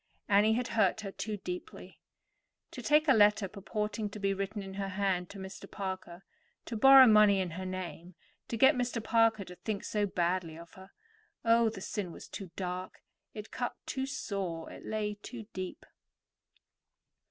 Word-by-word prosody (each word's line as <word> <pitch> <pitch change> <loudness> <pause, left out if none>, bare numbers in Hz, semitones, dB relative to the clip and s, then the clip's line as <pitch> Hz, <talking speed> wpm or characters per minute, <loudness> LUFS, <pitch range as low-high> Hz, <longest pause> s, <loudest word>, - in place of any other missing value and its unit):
Annie 210 +1 +4
had 245 +2 -1
hurt 215 -1 +2
her 200 -2 -5
too 215 +1 -4
deeply. 180 -2 -8 0.7
To - - -7
take 305 +1 +3
a 270 - +7
letter 210 -2 +4
purporting 210 +2 -3
to 210 - -9
be 195 -1 +1
written 195 +1 -4
in 195 0 -8
her 195 0 -3
hand 185 -2 -1
to 200 - -10
Mr. 190 0 -9
Parker, 185 -2 -6 0.4
to 230 - -5
borrow 270 +4 +9
money 210 -3 +6
in 185 -3 -2
her 185 +3 -5
name, 180 -1 -6 0.3
to 230 - -3
get 265 +5 +6
Mr. 245 -3 -2
Parker 225 -2 +3
to 180 - -10
think 210 -2 -4
so 210 -1 0
badly 175 -3 -1
of 170 0 -13
her. 190 +1 -13 0.6
Oh, 230 0 +5
the 215 -3 -8
sin 190 -2 -4
was - - -11
too 195 -3 -7
dark; 185 0 -5 0.3
it 210 0 -8
cut 245 - -3
too 265 0 -3
sore; 195 -11 -4
it - - -11
lay 210 -1 -3
too 240 -3 -8
deep. 185 -1 -6
200 Hz, 175 wpm, -31 LUFS, 185-220 Hz, 0.7 s, borrow